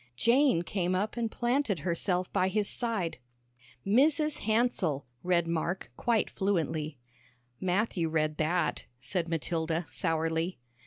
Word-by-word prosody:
Jane 240 - +4
came 180 0 -1
up 205 +4 -1
and 235 -2 -1
planted 240 - 0
herself 180 +2 -1
by 185 - +3
his 205 +1 0
side. 215 - -1 0.7
"'Mrs. 290 +8 +3
Hansell,'" 215 - +1 0.2
read 175 -2 +2
Mark, 170 -4 -2
quite 230 - +1
fluently. 160 -6 -1 0.6
"Matthew 185 -2 0
read 155 -1 0
that," 165 +2 0
said 170 +6 -2
Matilda, 165 +1 -1
sourly. 165 +2 -1
180 Hz, 115 wpm, -30 LUFS, 165-220 Hz, 0.7 s, Jane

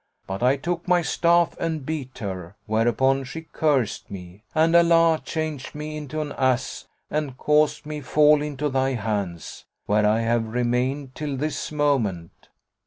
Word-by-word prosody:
But 95 +2 -5
I 130 +3 +3
took 170 +5 -3
my 180 -1 +3
staff 170 +1 +2
and 160 -4 -2
beat 140 -4 -5
her, 95 -3 -6
whereupon 120 +5 +2
she 135 +6 -7
cursed 145 -8 0
me 90 0 -10
and 165 +2 +4
Allah 165 -1 +5
changed 155 -4 -4
me 155 +1 -5
into 150 0 -4
an 150 -1 -4
ass 130 -2 0 0.2
and 150 -4 -2
caused 150 +1 +2
me 150 0 -5
fall 150 +2 +4
into 150 0 -2
thy 135 -1 0
hands, 100 -7 -4 0.2
where 105 0 +3
I 110 +2 +2
have 115 0 +1
remained 125 +4 -1
till 145 -2 -4
this 155 +3 -3
moment. 120 - -1
135 Hz, 155 wpm, -24 LUFS, 115-155 Hz, 0.2 s, Allah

